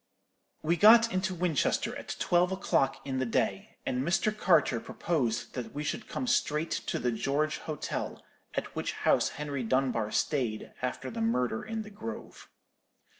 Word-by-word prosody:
"We 170 +3 +2
got 230 +4 +7
into 185 0 0
Winchester 170 -4 +1
at - - -6
twelve 175 +1 +2
o'clock 135 -7 0
in 130 -2 -2
the 130 - +1
day; 115 - -1
and 125 0 0
Mr. 175 +8 +1
Carter 165 - +3
proposed 130 -4 -2
that 120 -2 -6
we 150 - -2
should 215 - -3
come - - -3
straight 160 -9 +1
to - - -2
the 125 - 0
George 140 +7 0
Hotel, 155 -3 -4 0.4
at - - -3
which - - -2
house - - +2
Henry 145 -2 -3
Dunbar 125 -2 +1
stayed 120 -5 -1
after 125 0 -3
the 230 - -4
murder 125 - 0
in 225 -1 -4
the 210 - -11
grove. 115 - -8
150 Hz, 160 wpm, -30 LUFS, 125-185 Hz, 0.4 s, got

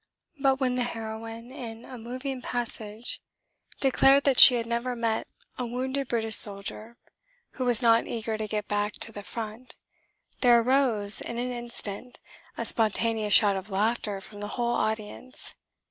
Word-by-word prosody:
But 270 -1 +2
when 255 -2 +1
the 250 0 0
heroine, 225 0 -6
in 235 -4 -8
a 255 - -10
moving 255 +3 -6
passage, 230 -2 -4 0.6
declared 270 +1 +4
that 270 -3 +3
she 255 - +11
had 230 -1 -1
never 235 +2 -2
met 230 -2 -1 0.3
a 250 - -1
wounded 260 +3 -3
British 225 -2 +1
soldier 210 +3 0 0.5
who 255 - -4
was 245 -1 +2
not 230 0 +4
eager 225 -1 -3
to 215 0 -3
get 210 0 -3
back 205 0 -1
to 225 - -1
the 205 - -8
front, 220 +5 -7 0.6
there 240 -2 +6
arose, 230 -5 +1
in 235 - -6
an 250 +1 -2
instant, 240 -1 -6 0.4
a - - -2
spontaneous 220 -1 +2
shout 205 -3 +6
of 190 +2 -6
laughter 210 0 -1
from 205 +1 -12
the 205 - -3
whole 240 0 0
audience. 220 +3 -3
230 Hz, 160 wpm, -27 LUFS, 215-250 Hz, 0.6 s, she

